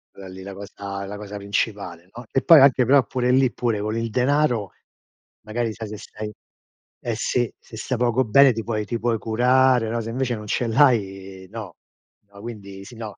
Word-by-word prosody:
Quella 95 -1 -10
lì 95 0 -10
la 100 +1 -8
cosa 100 0 -7
è - - -5
la 105 - -6
cosa 105 0 -7
principale, 100 -3 -3
no, 120 +1 -9
e 135 - +1
poi 165 -4 +8
anche 135 -2 +5
però 140 +2 +5
pure 125 0 0
lì, 130 -1 +4
pure 115 -4 -1
con 110 +2 -2
il 115 0 -2
denaro 125 -3 +1 0.7
magari, 115 +1 -2
sai, 110 0 -7
se 105 - -7
stai 105 0 -8 0.7
eh 115 -2 -2
sì, 120 +2 -1
se 110 - -13
stai 125 +3 -3
poco 125 +1 +2
bene 135 +4 +6
ti 115 0 -4
puoi 110 -2 -2
ti 120 - -2
puoi 115 -1 0
curare, 125 +1 +3
no, 115 +1 -2
se 115 - -6
invece 125 0 -1
non 105 0 -8
ce 120 - 0
l'hai, 95 -7 +1
no. 110 -7 -8 0.6
No, 100 - -13
quindi 100 -4 -9
sì, 120 - -12
no. 110 -2 -8
110 Hz, 205 wpm, -23 LUFS, 100-125 Hz, 0.7 s, poi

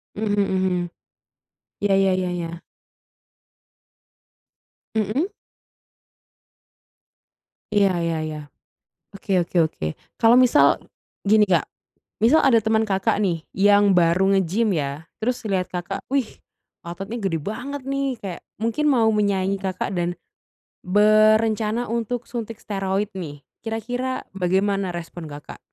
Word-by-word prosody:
Mhm 205 -1 0
mhm. 190 -2 +1 1.1
Iya 205 -1 +2
iya 195 0 +3
iya 180 -1 -1
iya. 170 -1 -5 2.4
Mhm? 220 - 0 2.5
Iya 200 -1 +4 0.2
iya 165 -1 -1
iya, 155 -1 -4 0.8
oke 200 - -11 0.2
oke 175 - -7
oke. 80 - -6 0.3
Kalau 230 +1 +6
misal 255 +3 +5 0.4
gini, 210 +1 +4
Kak, 175 -4 +3 0.6
misal 265 +7 +5
ada 230 -4 +5
temen 220 +1 +2
Kakak 200 +1 +1
nih 180 -6 0
yang 205 0 +5
baru 175 +3 +3
nge-gym 195 +3 +1
ya, 145 +1 -3
terus 245 +2 -2
liat 185 -2 +1
Kakak, 175 0 -4
"Wih, 270 -5 -1 0.5
ototnya 195 +7 -6
gede 190 -7 -1
banget 255 - -5
nih." 275 0 0
Kayak 185 -4 -6 0.2
mungkin 230 +7 0
mau 230 -4 +4
menyaingin 200 -2 +1
Kakak, 190 -1 -3
dan 175 0 0 0.7
berencana 215 +3 +3
untuk 235 +1 -2
suntik 230 -2 -6
steroid 195 -1 -2
nih, 145 -7 -7 0.2
kira-kira 245 +3 -3
bagaimana 195 +1 0
respon 170 -2 -7
Kakak? 145 0 -10
200 Hz, 115 wpm, -23 LUFS, 180-225 Hz, 2.5 s, Kalau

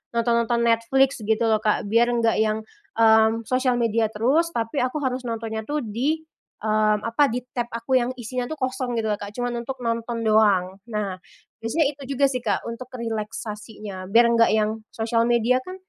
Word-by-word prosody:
nonton-nonton 235 0 +2
Netflix 235 +4 +2
gitu 220 +2 +1
lho, 220 -1 +3
Kak. 210 -1 +1
Biar 235 +1 +4
nggak 230 -1 +2
yang, 220 0 0 0.3
mmm, 220 0 +5
sosial 255 -1 +1
media 225 -1 +2
terus, 265 +11 +2
tapi 230 +4 -1
aku 255 +4 -1
harus 255 0 -1
nontonnya 225 -1 -4
tuh 295 +1 -1
di, 265 +9 -1 0.4
mmm, 215 -1 +2
apa, 255 +5 +3
di 245 +1 -2
tab 240 -1 -1
aku 235 +3 +1
yang 245 +1 -1
isinya 245 +2 -3
tuh - - -2
kosong 255 -1 -2
gitu 220 -1 -1
lho, 205 - 0
Kak, 205 0 -7
cuman 245 -1 -2
untuk 270 - -4
nonton 230 0 -2
doang. 200 -4 +3
Nah 200 -3 -2 0.5
biasanya 285 +6 +2
itu 285 - -16 0.2
juga 280 - +4
sih, 250 - -2
Kak, 210 - 0
untuk 240 +2 -7
relaksasinya. 215 -3 -6
Biar 235 +1 +6
nggak 230 0 +5
yang 215 +1 0 0.2
sosial 230 0 +1
media 240 +2 +3
kan 370 - -7
230 Hz, 180 wpm, -24 LUFS, 220-250 Hz, 0.5 s, Biar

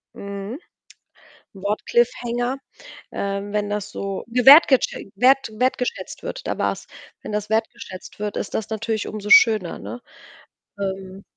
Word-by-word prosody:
Mhm. 200 +5 -6 0.9
Wort-Cliffhanger. 240 +5 0 0.5
Ähm, 200 +1 -3
wenn 210 -1 -1
das 205 -1 -3
so 195 -1 -4
gewertgetschä 260 -2 +6
wert 265 +4 +4
wertgeschätzt 250 +1 -2
wird - - -6
da - - -2
war's, - - -2 0.3
wenn - - -7
das 210 0 -2
wertgeschätzt 220 -4 -4
wird, 210 0 -3
ist - - -4
das 220 -1 -3
natürlich 220 0 -2
umso 210 -1 -6
schöner, 215 -7 +6
ne? 245 - -8 0.8
Ähm 190 0 -5
210 Hz, 120 wpm, -22 LUFS, 200-240 Hz, 0.9 s, gewertgetschä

